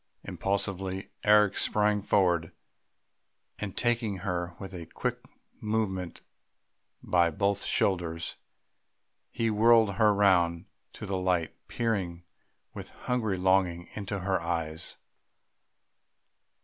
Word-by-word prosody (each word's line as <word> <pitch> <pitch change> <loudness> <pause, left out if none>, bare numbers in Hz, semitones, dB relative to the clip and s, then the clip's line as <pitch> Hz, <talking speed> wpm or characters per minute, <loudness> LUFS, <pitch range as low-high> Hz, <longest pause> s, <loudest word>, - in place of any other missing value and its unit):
Impulsively 95 -1 -3
Eric 105 -2 +5
sprang 105 -1 +2
forward, 90 -5 +2 1.1
and 100 -2 -5
taking 120 -4 0
her 90 -2 -2
with 95 0 -8
a 85 -3 -7
quick - - -3 0.4
movement 105 -5 -2 0.8
by 85 -1 +3
both 100 +5 0
shoulders, 85 -3 0 0.9
he 115 -2 -1
whirled 110 -2 +4
her 110 -2 +5
round 90 -4 +3 0.3
to 105 - -8
the 95 -1 -2
light, 90 -4 0
peering 95 -7 -2 0.5
with - - -8
a - - -20
hungry 110 -6 -1
longing 90 -2 +1
into 100 -2 -4
her 95 -1 0
eyes.... 85 -2 -2
95 Hz, 105 wpm, -29 LUFS, 85-105 Hz, 1.1 s, Eric